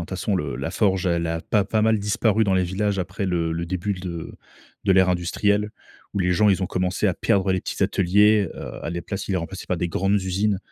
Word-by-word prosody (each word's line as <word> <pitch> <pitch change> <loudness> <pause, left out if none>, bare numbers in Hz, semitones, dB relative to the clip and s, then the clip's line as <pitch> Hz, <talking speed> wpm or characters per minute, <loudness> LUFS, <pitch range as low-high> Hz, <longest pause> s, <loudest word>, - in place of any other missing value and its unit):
toute 85 - -7
façon 95 +2 -1
le 75 -6 -3
la - - -3
forge, 95 -3 +1
elle 85 -1 +1
a 80 0 -2
pas 105 +4 +1
pas 110 +2 0
mal 110 0 +3
disparu 105 +1 +1
dans 95 - +1
les 95 -1 +2
villages 100 +3 -1
après 95 +3 -3
le 85 -3 0
le 85 +1 -2
début 95 +3 -2
de 90 -3 -6 0.5
de 100 - +4
l'ère 95 -1 +5
industrielle, 100 +4 +1 0.4
où 100 - -2
les 90 -1 +2
gens, 105 +4 +4
ils 95 0 +1
ont - - 0
commencé 90 -1 -1
à - - +1
perdre 95 -1 +1
les 95 -1 0
petits - - -3
ateliers, 100 +1 +3
heu, - - -8
à - - -2
la 85 0 -3
place, 95 +3 -5
ils - - -5
les 95 - +1
remplaçaient 90 +3 -6
par 90 - -1
des 90 - -1
grandes 95 +4 +1
usines, 95 +2 0
95 Hz, 245 wpm, -23 LUFS, 90-100 Hz, 0.5 s, l'ère